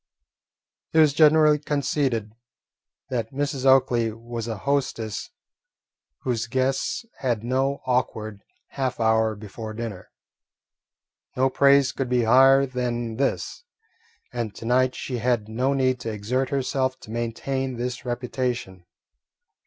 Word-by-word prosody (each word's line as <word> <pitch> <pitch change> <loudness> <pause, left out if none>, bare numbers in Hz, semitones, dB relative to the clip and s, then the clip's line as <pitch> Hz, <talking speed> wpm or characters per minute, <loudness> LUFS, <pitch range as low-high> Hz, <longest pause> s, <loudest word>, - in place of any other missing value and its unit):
It - - +1
was 155 -3 +6
generally 150 0 +5
conceded 140 -7 -1 0.8
that 115 -3 -2
Mrs. 140 -1 -2
Oakley 120 -4 +4
was 115 +1 -6
a 110 -2 -3
hostess 115 -4 -2 0.9
whose 120 -3 -1
guests 130 - -1
had 120 -5 -1
no 135 +3 0
awkward 110 -5 -1 0.3
half 130 -2 -3
hour 110 -1 +2
before 110 +1 -8
dinner. 110 -5 -6 1.3
No 130 +1 +3
praise 140 0 +5
could 135 -2 -3
be 125 -1 +2
higher 135 +4 +6
than 120 -3 -3
this, 135 - -2 0.7
and 115 -5 -3
to - - -9
night 130 +2 +2
she 125 -2 -4
had 115 -2 0
no 130 +5 0
need 130 -2 +1
to 115 -1 -4
exert 120 +6 -1
herself 130 -1 -1
to 110 - -11
maintain 125 +3 -3
this 125 +1 -4
reputation. 120 -7 -3
125 Hz, 120 wpm, -24 LUFS, 115-135 Hz, 1.3 s, was